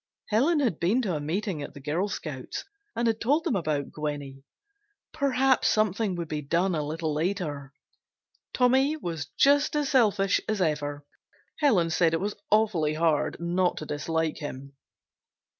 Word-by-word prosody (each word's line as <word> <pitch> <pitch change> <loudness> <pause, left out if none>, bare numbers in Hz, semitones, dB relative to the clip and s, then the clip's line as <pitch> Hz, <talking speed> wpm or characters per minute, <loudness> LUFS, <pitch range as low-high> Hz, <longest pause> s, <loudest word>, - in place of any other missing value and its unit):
Helen 290 +9 +3
had 230 - 0
been 215 +10 +2
to 190 -5 -1
a - - -2
meeting 170 +2 -2
at 145 - -8
the - - -8
Girl 155 +8 -1
Scouts 150 -9 -6 0.3
and 235 - 0
had 225 -1 +1
told 290 +7 +2
them 320 -8 0
about 155 -6 -1
Gwenny. 145 -3 -5 0.7
Perhaps 270 -3 +2
something 215 -2 +1
would 170 -1 -4
be 150 -1 -3
done 170 +6 +1
a 155 - 0
little 155 +1 -3
later. 150 -4 -2 0.8
Tommy 265 +4 +3
was 170 - -4
just 285 +2 +4
as 295 -2 0
selfish 205 -7 +3
as 215 -2 0
ever. 145 -4 -1 0.5
Helen 195 - +3
said 165 0 +3
it - - -1
was 205 +2 -2 0.2
awfully 195 -8 +2
hard 160 -2 +1
not 175 +1 0
to 155 - -5
dislike 160 +2 -2
him. 140 -2 -7
175 Hz, 160 wpm, -27 LUFS, 150-225 Hz, 0.8 s, just